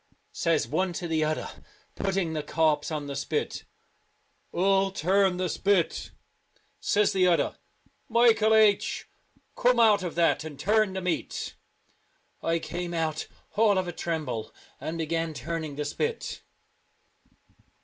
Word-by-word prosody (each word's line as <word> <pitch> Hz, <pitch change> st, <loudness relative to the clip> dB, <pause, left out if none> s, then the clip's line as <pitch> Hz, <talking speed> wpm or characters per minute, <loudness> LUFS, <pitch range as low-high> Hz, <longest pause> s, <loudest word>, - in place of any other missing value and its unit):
Says 165 Hz, -3 st, +1 dB
one 185 Hz, -1 st, 0 dB
to 175 Hz, +1 st, -4 dB
the 160 Hz, -1 st, 0 dB
Celtic. 155 Hz, 0 st, 0 dB
Twilight, -, -, -8 dB
other, -, -, -24 dB, 0.3 s
putting 195 Hz, -4 st, -1 dB
the 155 Hz, -, -1 dB
corpse 150 Hz, 0 st, +1 dB
on 150 Hz, -2 st, -3 dB
the 140 Hz, -1 st, -5 dB
spit, 145 Hz, +2 st, -2 dB, 0.4 s
" -, -, -43 dB
Who'll 195 Hz, +2 st, +3 dB
turn 190 Hz, +1 st, +2 dB
the 185 Hz, 0 st, 0 dB
spit? 190 Hz, 0 st, +1 dB, 0.4 s
" -, -, -45 dB, 0.3 s
Says 210 Hz, 0 st, +2 dB
the 185 Hz, -1 st, +4 dB
other, 175 Hz, -2 st, +1 dB, 0.3 s
" -, -, -38 dB
Michael 220 Hz, -2 st, +5 dB
H, 215 Hz, -2 st, +3 dB, 0.5 s
come 245 Hz, -1 st, +3 dB
out 220 Hz, -3 st, +5 dB
of 180 Hz, -3 st, -4 dB
that 170 Hz, -2 st, +2 dB
and 155 Hz, -3 st, -8 dB
turn 215 Hz, -1 st, +2 dB
the 190 Hz, -, -3 dB
meat." 180 Hz, -1 st, -3 dB, 0.9 s
I 165 Hz, 0 st, +1 dB
came 175 Hz, +1 st, -4 dB
out 160 Hz, -2 st, -1 dB, 0.3 s
all 210 Hz, -2 st, +4 dB
of 185 Hz, -1 st, 0 dB
a -, -, -2 dB
tremble, 155 Hz, -10 st, -3 dB, 0.3 s
and 165 Hz, +1 st, -4 dB
began 165 Hz, 0 st, -2 dB
turning 160 Hz, -2 st, -4 dB
the 150 Hz, +1 st, -3 dB
spit. 455 Hz, -, -3 dB
175 Hz, 150 wpm, -27 LUFS, 160-195 Hz, 0.9 s, Michael